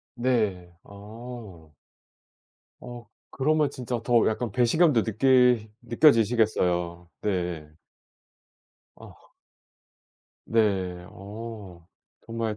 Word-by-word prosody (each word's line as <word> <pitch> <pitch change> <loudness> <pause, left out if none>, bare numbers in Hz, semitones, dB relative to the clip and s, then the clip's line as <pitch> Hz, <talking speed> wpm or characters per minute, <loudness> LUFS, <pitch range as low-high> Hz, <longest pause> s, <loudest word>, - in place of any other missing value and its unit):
네. 105 -8 -1
어. 105 -5 -11 1.1
어 120 -1 -10 0.2
그러면 150 +1 +1
진짜 125 -3 -4
더 120 -2 +3
약간 110 -1 -3
배신감도 125 - +3
느끼 125 0 +3
느껴지시겠어요. 110 - +2
네. 85 -6 -3 1.2
어. - - -16 1.1
네. 95 -5 0
어 100 -4 -10 0.4
정말 115 -2 -3
110 Hz, 145 characters per minute, -26 LUFS, 95-120 Hz, 1.2 s, 더